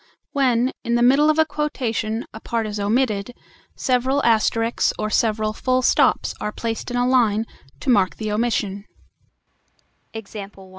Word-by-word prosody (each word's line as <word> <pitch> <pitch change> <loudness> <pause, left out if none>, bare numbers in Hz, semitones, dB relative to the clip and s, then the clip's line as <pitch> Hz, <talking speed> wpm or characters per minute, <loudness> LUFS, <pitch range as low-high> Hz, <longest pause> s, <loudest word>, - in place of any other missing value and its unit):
When, 255 -2 +2
in 235 -1 0
the 240 - +3
middle 275 +5 +5
of 310 - +2
a 315 - +5
quotation, 235 -7 -2
a 220 - -8
part 230 0 -2
is 210 -1 -4
omitted, 215 +1 0 0.4
several 260 +2 +1
asterisks 225 0 +2
or 215 0 -2
several 215 -1 +1
full 255 +2 0
stops - - +2
are 210 - -2
placed 225 +2 -4
in 245 - -2
a 245 0 +2
line 225 -4 +2 0.4
to 280 - -3
mark 195 -6 +2
the 215 -1 -4
omission. 210 -3 -1
235 Hz, 145 wpm, -22 LUFS, 215-255 Hz, 0.4 s, middle